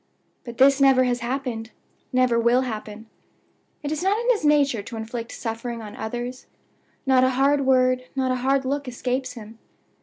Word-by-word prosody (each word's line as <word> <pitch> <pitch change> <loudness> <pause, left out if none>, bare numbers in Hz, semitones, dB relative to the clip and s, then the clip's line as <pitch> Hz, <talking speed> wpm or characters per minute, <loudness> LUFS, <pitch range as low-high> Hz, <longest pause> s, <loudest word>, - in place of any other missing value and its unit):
"But 235 -1 -9
this 275 +1 +5
never 265 -2 +6
has 245 -1 0
happened 240 -2 -4 0.4
never 255 -2 +3
will 235 +2 +3
happen. 220 -3 -6 0.8
It 290 - -3
is 310 - -2
not 390 +4 +1
in 475 +1 +2
his 440 - -1
nature 285 -6 +3
to 225 +3 -8
inflict 230 +1 -6
suffering 230 +1 -5
on 210 -1 -9
others. 240 +3 -5 0.6
Not 260 -1 +4
a 260 - +4
hard 275 0 +2
word, 255 -1 +3
not 260 -1 0
a 255 - 0
hard 270 +1 +1
look, 280 +1 -2
escapes 250 +1 -3
him. 225 -1 -11
255 Hz, 175 wpm, -24 LUFS, 235-270 Hz, 0.8 s, never